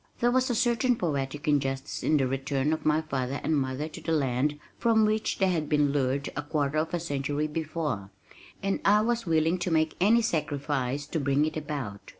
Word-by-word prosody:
There 240 +1 +3
was 260 +1 +2
a 240 - +1
certain 240 +2 +2
poetic 145 -6 -2 0.2
justice 135 0 -4
in 155 - +3
the 135 - +2
return 135 +3 0
of 155 - -3
my 155 +1 +3
father 135 -2 -2
and 160 - +1
mother 135 +1 -1
to - - -10
the 165 - -3
land 145 -1 +1 0.2
from 225 -2 +4
which 215 0 0
they 190 -1 +2
had 160 -4 -1
been 150 -2 +3
lured 140 0 0
a 145 - -1
quarter 145 0 -1
of 160 +2 -1
a - - -1
century 145 -2 -2
before, 155 - -3 0.5
and 195 0 0
I 210 +2 +5
was 235 -2 -1
willing 165 +2 +2
to 175 - -1
make 160 -1 +2
any 230 +5 +5
sacrifice 145 - -1
to 160 - -3
bring 140 +1 +2
it 155 - -3
about. 140 -10 -5
150 Hz, 200 wpm, -28 LUFS, 140-175 Hz, 0.5 s, I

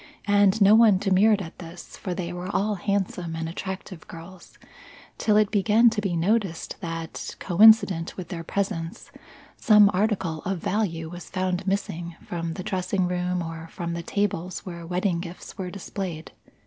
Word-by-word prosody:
And 205 0 +4
no 200 +2 +7
one 220 -3 +6
demurred 200 +2 +3
at 165 - -11
this, 170 0 -10
for 180 -2 -5
they 175 -1 -4
were 180 +1 -5
all 210 +2 0
handsome 185 -4 -2
and 165 0 -3
attractive 185 0 -7
girls, 170 +2 -12 0.6
till 210 -1 +3
it 215 -1 +3
began 220 +3 +4
to 215 -2 -2
be 195 -4 -1
noticed 190 0 0
that, 165 -1 -5
coincident 195 -3 +5
with 180 -3 -7
their 170 -3 -5
presence, 180 -2 -3 0.5
some 210 -2 +6
article 190 -5 0
of 195 +1 -2
value 170 -3 -2
was 175 0 -9
found 185 0 -2
missing 175 -3 -2
from 165 -2 -4
the 185 - -5
dressing 185 0 -1
room 180 0 -1
or 165 0 -7
from 170 0 -5
the 170 - -3
tables 185 -1 -2
where 170 -2 -7
wedding 180 0 0
gifts 170 0 -9
were 185 -2 -5
displayed. 180 -4 -6
185 Hz, 160 wpm, -25 LUFS, 170-200 Hz, 0.6 s, no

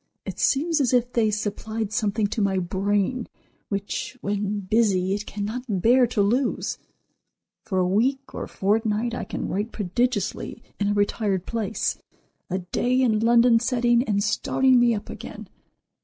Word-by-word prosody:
It - - -6
seems 310 +3 +2
as 255 -2 +1
if 245 0 +2
they 225 -2 +3
supplied 215 +1 -3
something 215 -1 0
to 210 +2 -2
my 195 -1 +1
brain 200 +6 0 0.4
which, 200 +5 -3
when 205 0 -2
busy, 195 -2 +2
it 205 +1 -4
cannot 210 +4 -4 0.2
bear 245 +5 +5
to 215 -3 +1
lose. 245 +7 0 0.9
For 200 -4 -2
a 180 -1 +2
week 260 +8 0
or - - -5
fortnight 215 +3 0
I - - -3
can - - -4
write 210 +4 -2
prodigiously 210 +1 -2 0.2
in 205 - +1
a 205 - +2
retired 205 -2 0
place, 225 -2 -2 0.5
a 185 - -1
day 245 +8 0
in 230 -5 +3
London 235 +1 +5
setting 240 0 +2
and 200 -3 +1
starting 255 +4 +3
me 240 -1 +4
up 205 - -6
again. - - -8
215 Hz, 155 wpm, -24 LUFS, 200-240 Hz, 0.9 s, bear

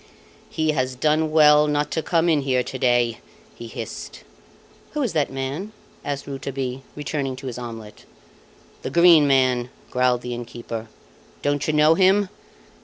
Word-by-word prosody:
"He 155 -1 0
has 130 -3 -1
done 155 +4 +1
well 150 -1 +6
not 150 0 0
to 160 - -1
come 165 +1 +1
in 155 -4 +3
here 130 -2 +1
to 130 - -7
day!" 120 -2 +2 0.3
he 115 - -9
hissed. - - -8 0.7
"Who 300 -1 -1
is 235 - -2
that 150 -4 0
man?" 135 +10 -4 0.3
asked 140 -1 -4
Rouletabille, 135 -1 -4
returning 140 -2 -3
to 135 +1 -11
his 125 -2 -5
omelette. 115 -3 -9 0.8
"The - - -4
Green 170 -3 +6
Man," 130 -3 +2 0.2
growled 125 -1 +2
the 125 - -4
innkeeper. 120 -1 -6 0.6
"Don't 145 -1 0
you 155 - +1
know 150 +1 +5
him? 190 +3 +3
140 Hz, 155 wpm, -23 LUFS, 125-155 Hz, 0.8 s, well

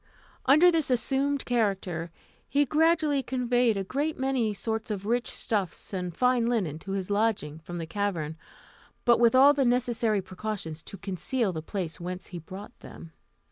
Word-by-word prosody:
Under 310 +7 +7
this 320 -4 +1
assumed 270 +3 +1
character, 195 -8 -1 0.4
he 290 +1 +3
gradually 310 -1 +3
conveyed 245 -3 +1
a 195 - -1
great 285 +10 -2
many 260 -4 0
sorts 220 +2 -3
of 200 -2 -3
rich 240 +3 0
stuffs 200 -3 -3
and 180 -3 -4
fine 250 -2 +3
linen 190 -11 -1
to 195 +3 -6
his 195 0 -3
lodging 200 -8 0
from 175 +2 -7
the 165 - -4
cavern, 165 -4 -2 0.7
but 235 -1 +5
with 235 0 +5
all 275 +3 +8
the 280 -2 +1
necessary 240 -3 +1
precautions 185 -4 -5
to 200 - -10
conceal 200 +3 -2
the 160 - -4
place 175 -1 -4
whence 180 +1 -5
he 175 - -4
brought 190 +7 -10
them. 165 - -11
220 Hz, 165 wpm, -28 LUFS, 185-255 Hz, 0.7 s, all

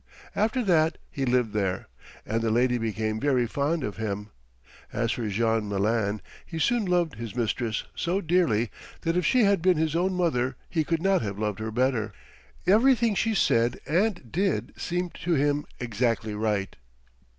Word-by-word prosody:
After 225 +4 +1
that 160 -5 +3
he 135 - -2
lived 125 -3 +1
there, 95 -3 -1 0.4
and 115 +1 -1
the 115 - +1
lady 125 +2 +2
became 110 -1 -2
very 130 -3 +2
fond 145 +6 -1
of 105 -3 -4
him. 105 -1 -4 0.6
As 115 +2 0
for 115 -2 -2
Jean 110 0 +1
Malin, 100 0 0 0.2
he 165 - -7
soon 235 +6 +2
loved 175 - +1
his 115 -1 -6
mistress 115 -1 -1
so 175 +3 -1
dearly 160 - +2 0.3
that 165 0 0
if 180 - +2
she 255 -3 +4
had 200 -4 +3
been 180 -1 +4
his 160 0 0
own 185 +2 +1
mother 130 -8 +1
he 160 -3 0
could 165 +1 -1
not 195 0 +3
have 100 -3 -4
loved 105 -1 -2
her 110 0 -3
better. 115 -2 0 0.5
Everything 235 +2 +4
she 225 +2 +1
said 120 - +2
and 175 - 0
did 195 +2 0
seemed 175 0 -3
to 175 -1 +2
him 145 +1 +1
exactly 115 -2 -1
right. 105 -2 -1
125 Hz, 170 wpm, -27 LUFS, 110-175 Hz, 0.6 s, she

